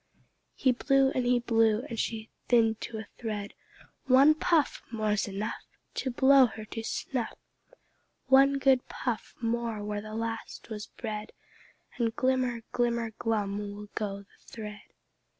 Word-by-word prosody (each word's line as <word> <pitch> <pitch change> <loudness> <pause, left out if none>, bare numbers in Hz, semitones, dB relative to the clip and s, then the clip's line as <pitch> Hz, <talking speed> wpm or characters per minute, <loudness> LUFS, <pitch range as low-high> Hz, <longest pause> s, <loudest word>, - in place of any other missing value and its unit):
He 260 - +3
blew 270 +1 +3
and 245 -2 +1
blew, 225 -1 +3
and 230 -5 -5
she 220 -1 -3 0.2
thinned 225 -2 +3
to 225 - -5
a 220 - -6
thread. 210 -3 -4 0.5
"One 270 +4 +7
puff 315 -1 +1
More's 215 -3 0
enough 205 +3 -4 0.3
To 265 - -2
blow 265 +1 +6
her 220 -1 -8
to 225 +1 -5
snuff! 235 +1 -3 0.9
One 275 +1 +6
good 265 -2 +3
puff 240 -4 -3
more 230 -2 -1
where 210 0 -3
the 215 +1 -8
last 225 0 -5
was 210 -1 -5
bred, 215 -2 -6 0.7
And 230 -1 +1
glimmer, 255 -3 +1
glimmer, 235 -2 0
glum 205 -3 0
will 205 0 -7
go 200 -2 -3
the - - -31
thread!" 210 -4 -8
230 Hz, 140 wpm, -29 LUFS, 215-255 Hz, 0.9 s, One